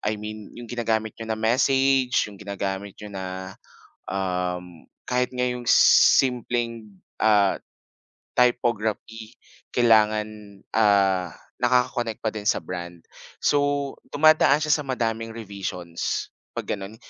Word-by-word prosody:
I 105 0 -1
mean, 105 0 -8
yung 120 - -8
ginagamit 110 -2 -2
niyo 115 0 -9
na 110 - -1
message, 130 +3 +2
yung 100 -2 -11
ginagamit 100 -1 -4
niyo 105 -1 -10
na, 95 0 -6 0.5
um, 90 -2 -3 0.2
kahit 125 0 0
nga 125 - -4
yung 125 0 -4
simpleng, 120 -2 +4 0.3
ah, 105 -3 +3 0.8
typography 115 -1 0 0.3
kailangan, 110 -3 +3 0.5
ah, 100 -4 +3 0.3
nakaka-connect 125 -3 +1
pa 110 - 0
din 105 -1 -3
sa - - +1
brand. 85 -1 -6 0.5
So, 145 -1 +1 0.2
dumadaan 155 -1 +5
siya 150 - +1
sa 150 - +3
madaming 115 -2 -2
revisions, 95 -5 -4 0.2
'pag - - -3
gano'n. 100 +2 -6
110 Hz, 115 wpm, -24 LUFS, 100-125 Hz, 0.8 s, dumadaan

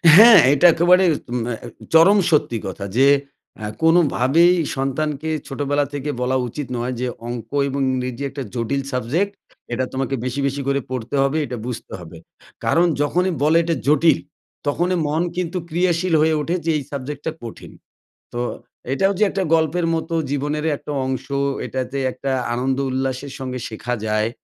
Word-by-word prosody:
হ্যাঁ, 225 0 +10
এটা 160 +5 +3
একেবারে 180 +3 +4 0.4
ম্যা 120 0 -2 0.4
চরম 180 +6 +7
সত্যি 145 -6 +2
কথা। 95 +1 -6
যে 135 +1 +6 0.6
আ - - -2 0.2
কোনোভাবেই 165 0 +4 0.2
সন্তানকে 145 +3 -2 0.2
ছোটোবেলা 145 +1 0
থেকে 145 +1 -4
বলা 130 +1 +1
উচিত 140 +3 -6
নয়, 125 +2 -2
যে 125 - 0 0.2
অঙ্ক 120 -1 -6 0.2
এবং 140 +1 -2
ইংরেজি 125 0 -3
একটা 140 0 -6
জটিল 125 +3 -1
সাবজেক্ট, 160 - -1 0.4
এটা 130 +2 0
তোমাকে 135 +1 -1
বেশি, 130 +2 -3
বেশি 140 +1 -3
করে 140 0 +1
পড়তে 130 +1 -4
হবে, 135 +3 0
এটা 125 -1 -5
বুঝতে 125 -2 -6
হবে। 85 -1 -11 0.5
কারণ 170 +2 +3 0.2
যখনই 180 +5 +1
বলে 155 +2 +4
এটা 165 0 0
জটিল, 150 0 +4 0.5
তখনই 175 +5 +1
মন 155 +3 0 0.2
কিন্তু 180 0 -2
ক্রিয়াশীল 175 +1 +1
হয়ে 160 0 +3
ওঠে, 165 +4 -1
যে 165 - +2
এই 145 - -4
সাবজেক্টটা 145 +3 -4
কঠিন। 115 - -9 0.6
তো 120 - -3 0.5
এটাও 195 +7 +2
যে - - +5
একটা 195 -1 -1
গল্পের 165 +2 +2
মত 160 +1 -2 0.2
জীবনেরই 150 +2 -1
একটা - - -8
অংশ। 130 0 -3 0.4
এটা 130 - -3
যে 140 - -1
একটা 135 +2 -4 0.2
আনন্দ 130 +2 0
উল্লাসের 130 +1 -3
সঙ্গে 130 -1 -4
শেখা 115 +2 -4
যায়। 110 +1 +1
140 Hz, 160 wpm, -21 LUFS, 130-165 Hz, 0.6 s, হ্যাঁ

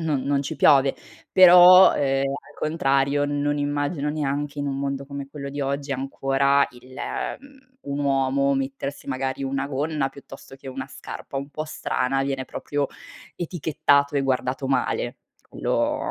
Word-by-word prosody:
non 150 -5 -1
non 140 0 0
ci 140 - -5
piove. 135 -2 +5 0.4
Però, 180 0 +9
uhm, - - -2
al 135 0 -1
contrario, 140 -2 +1
non 145 0 -1
immagino 145 +1 -1
neanche 145 -1 -3
in 145 - -2
un 135 -1 -2
mondo 140 0 -3
come 140 -1 -7
quello 140 -2 -7
di 145 +1 -5
oggi, 140 +1 -2
ancora 135 +1 +1
il 125 +1 -15 0.5
mhmm, 265 -2 -20
un 140 0 -3
uomo 140 0 +2
mettersi 135 +1 -4
magari 135 0 -3
una 135 0 -2
gonna, 145 0 -1
piuttosto 135 0 -13
che 135 - -16
una 130 0 -6
scarpa 135 - -8
un 140 +1 -4
po' 155 +1 -4
strana, 135 -3 -1
viene 135 -1 -2
proprio 145 +1 -3 0.5
etichettato 155 -4 +1
e - - +3
guardato 130 0 -1
male. 135 - -1 0.4
Lo - - 0
140 Hz, 155 wpm, -24 LUFS, 135-145 Hz, 0.5 s, Però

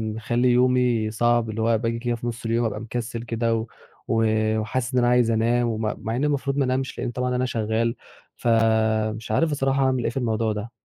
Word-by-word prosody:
مخلّي 120 +3 0
يومي 125 -3 +2
صعب 120 0 +1
اللي 110 +1 -3
هو 115 0 +3
باجي 115 +1 -2
كده 120 0 -1
في 120 +1 -6
نُص 120 0 -5
اليوم 115 +1 +1
أبقى 105 -1 -2
مكسّل 115 0 -4
كده، 115 -1 0
و 110 +1 -3 0.4
و 115 0 +2 0.4
وحاسس 125 +4 -2
إن 125 - +3
أنا 120 - +3
عايز 125 -2 +3
أنام، 120 +2 +2
وم 110 -1 -2 0.2
مع 115 +1 -2
إني 135 +4 0
المفروض 140 -1 -1
ما 140 - +2
أنامش 130 +1 -2
لإن 120 - -2
طبعًا 125 +1 -2
أنا 125 +1 +1
شغّال 115 0 -1 0.4
ف - - -5 0.7
مش 110 0 -8
عارف 160 +8 +2
بصراحة 135 -1 +1
أعمل 130 -2 +1
ايه - - +1
في - - -7
الموضوع 110 -3 0
ده. 105 +2 -5
120 Hz, 215 wpm, -24 LUFS, 115-125 Hz, 0.7 s, هو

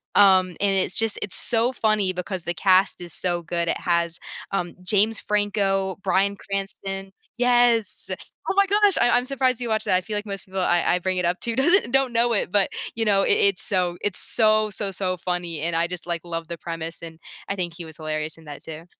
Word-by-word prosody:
um, 190 -2 +5
and 200 -1 +2
it's 190 -1 +1
just 225 -2 +5
it's 205 - +1
so 235 +1 +4
funny 215 -5 0
because 180 0 -5
the 175 - -3
cast 185 0 +2
is 175 - 0
so 175 -1 +4
good. 170 +1 -3
It - - -1
has, 170 -1 +1 0.4
um, 175 -3 -3
James 210 +4 +3
Franco, 195 -2 -1
Bryan 200 +1 0
Cranston 195 0 -5 0.3
yes, 240 -2 +3 0.4
oh - - 0
my 400 0 +4
gosh, 410 0 +2
I 240 - +3
I'm 245 +1 +2
surprised 260 -2 0
you 240 - -4
watched 220 -1 -1
that, 185 - +2
I 185 - -2
feel 210 +2 -5
like 205 - -5
most 195 -2 -6
people 190 0 -5
I 175 -1 +2
I - - -2
bring 185 +1 -3
it 180 - -1
up 175 +1 -1
to 235 - -2
doesn't 280 - +2
don't 270 -2 +1
know 235 +1 +1
it, 200 - -1
but, 200 -2 +2 0.3
you 230 - -1
know, 200 -2 +2
it - - +1
it's 200 -2 +2
so 180 -3 +1
it's 205 -3 +1
so, 215 -1 +4
so, 205 0 0
so 185 -1 -2
funny, 175 -2 -4
and 165 +1 -2
I 165 +1 +1
just, 180 0 -6
like, 170 -1 -3
love 165 -1 -6
the 170 0 -7
premise 165 0 -4
and 165 -1 -11 0.3
I 200 - -2
think 175 -2 -3
he 170 - -9
was 160 -1 -5
hilarious 155 0 -2
in 160 - -18
that 145 -1 -9
too. 160 +1 -9
195 Hz, 225 wpm, -22 LUFS, 175-215 Hz, 0.4 s, um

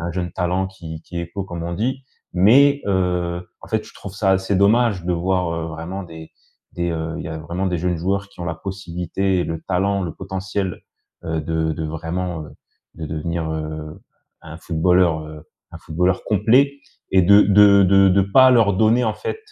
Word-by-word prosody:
a - - -3
un - - -3
jeune 90 -2 -3
talent 90 +1 -1
qui 80 -4 -9
qui 85 - -7
éclot 90 +3 -5
comme 85 -3 -6
on 85 +1 -4
dit 130 +6 -2 0.3
mais, 140 +10 +5
heu, 90 -2 -1
en - - -13
fait - - -1
je - - -15
trouve 100 0 -10
ça 100 -2 +1
assez 95 +1 +1
dommage 100 -2 +3
de 90 - 0
voir, 90 0 0
heu, 80 0 -3
vraiment 85 +4 -6
des 80 -2 -11 0.4
des, 85 0 -2
heu, 80 0 -3
il - - -5
y - - -5
a 80 - -5
vraiment 85 +4 -4
des 90 -1 0
jeunes 90 0 -1
joueurs 100 +3 -1
qui - - -15
ont 85 - -4
la 80 - -2
possibilité 95 +1 -3
et - - -1
le 80 0 -4
talent, 95 +1 0
le 85 - -5
potentiel, 95 0 -4 0.4
heu, 80 -1 -2
de 80 0 -1
de 80 +1 -4
vraiment, 80 +2 -4
heu, - - -12 0.4
de 80 - -7
devenir, 80 +1 -3
heu, 75 0 -6 0.4
un 80 0 -10
footballeur, 85 -1 +2
heu, 75 0 -11 0.3
un - - -8
footballeur 90 +3 -1
complet 115 +7 +3 0.4
et 95 - +5
de 100 +3 +6
de 100 0 +6
de 95 +1 +5
de 95 +1 +4
pas 130 +7 +5
leur 115 -5 +4
donner 115 +3 +3
en 110 - 0
fait, 275 - -5
90 Hz, 205 wpm, -21 LUFS, 80-100 Hz, 0.4 s, de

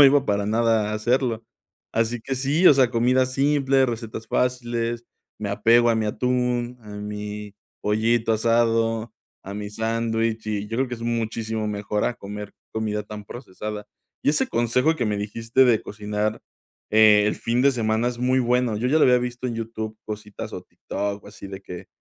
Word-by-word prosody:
no - - +11
iba 140 0 +6
para 100 -4 0
nada 110 -1 +2
a - - -1
hacerlo. 120 +1 0 0.5
Así 115 +1 0
que 135 - -2
sí, 140 +7 +2
o - - +10
sea, 130 -3 +4
comida 125 +2 +3
simple, 135 0 +2
recetas 115 -2 -4
fáciles, 120 -1 -1 0.3
me 105 -2 -3
apego 115 +4 +4
a - - +3
mi 110 -1 0
atún, 125 +1 -1
a 110 - -15
mi 105 0 -6 0.3
pollito 110 +2 +2
asado, 115 0 +1 0.3
a 100 - -7
mi 105 0 -5
sándwich, 115 +1 -1
y 105 -1 -2
yo 115 +2 -3
creo 135 0 +1
que 120 - -3
es 115 - -10
muchísimo 115 -2 -2
mejor 105 0 -2
a 120 - 0
comer 105 -1 -8 0.2
comida 105 -1 -2
tan 105 -1 -9
procesada. 105 -3 -7 0.4
Y - - +5
ese 150 - +2
consejo 125 +7 +2
que 125 - -1
me 105 -2 -1
dijiste 115 +5 +2
de 115 -3 +3
cocinar, 105 +1 -3 0.5
eh, 105 -1 +7
el 105 - 0
fin 120 +2 0
de 140 0 +5
semana 110 -1 0
es 120 -1 -5
muy 130 +1 +2
bueno. 125 -2 +1
Yo 115 +4 -1
ya 140 +5 +3
lo - - +5
había 125 -1 +6
visto 125 +1 -4
en 120 - -3
YouTube, 110 -1 -5
cositas 105 -1 -7
o - - -5
TikTok 100 0 -5
o - - -13
así 105 -1 -10
de 95 0 -8
que, 90 0 -8
115 Hz, 190 wpm, -24 LUFS, 105-125 Hz, 0.5 s, no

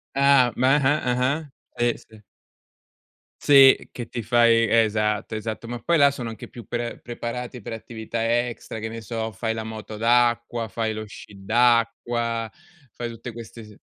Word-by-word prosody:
Ah, 140 -3 +5
ma 130 +2 +3
ah-ah, 145 +2 +2
ah-ah, 130 +5 0 0.3
sì, 120 0 +1
sì. 110 -1 -16 1.2
Sì, 135 -2 +6
che 120 -2 -7
ti 120 - -5
fai 115 0 +4
esatto, 105 -1 +1
esatto, 110 +1 -5
ma 120 0 -5
poi 170 +7 +1
là 140 0 +7
sono 125 -4 -5
anche 110 - -9
più 120 - -11
pre 120 0 -4
preparati 120 0 -6
per 115 - -7
attività 115 +1 -2
extra, 115 -1 -7
che 110 - -4
ne 115 +1 -7
so, 110 +1 -4
fai 110 +3 -3
la 110 - -4
moto 110 -1 -8
d'acqua, 120 0 +1
fai 110 +2 -2
lo 110 0 -5
sci 100 -1 -13
d'acqua, 115 0 +1 0.4
fai 120 -1 -5
tutte 115 +1 -8
queste 115 0 -10
s 105 -1 -15
115 Hz, 165 wpm, -24 LUFS, 110-120 Hz, 1.2 s, là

